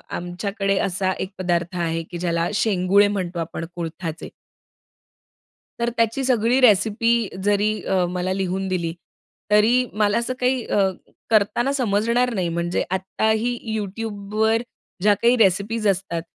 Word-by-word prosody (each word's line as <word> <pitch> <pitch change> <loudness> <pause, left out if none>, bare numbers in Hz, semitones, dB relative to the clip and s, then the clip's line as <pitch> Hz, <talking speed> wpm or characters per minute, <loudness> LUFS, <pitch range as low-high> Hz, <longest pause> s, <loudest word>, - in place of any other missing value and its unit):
आमच्याकडे 195 +3 -2
असा 185 0 -1
एक 190 - -4
पदार्थ 175 -1 -1
आहे, 165 -1 -1
की 175 +2 -8
ज्याला 170 -1 0
शेंगुळे 200 -1 +3
म्हणतो, 185 -4 -3
आपण 165 0 -4
कुळथाचे. 165 -1 -5 1.5
तर 235 0 +1
त्याची 230 +4 +1
सगळी 245 0 +2
रेसिपी 220 0 +4 0.3
जरी 205 +1 +2
अ, 185 -2 +1
मला 180 +1 -2
लिहून 190 0 -2
दिली, 170 -3 -2 0.6
तरी 230 +4 +4
मला 210 -1 +2
असं 235 +2 -1
काही 255 -1 +1
अ, 195 -2 +2 0.4
करताना 225 +4 +2
समजणार 235 0 +1
नाही. 185 -5 -1
म्हणजे 170 +1 -1
आत्ताही 220 +5 0 0.2
YouTubeवर 215 +1 -1 0.4
ज्या 205 +2 +5
काही 235 +1 +5
रेसिपीज 210 +2 +2
असतात, 185 -3 -1
200 Hz, 130 wpm, -22 LUFS, 180-220 Hz, 1.5 s, ज्या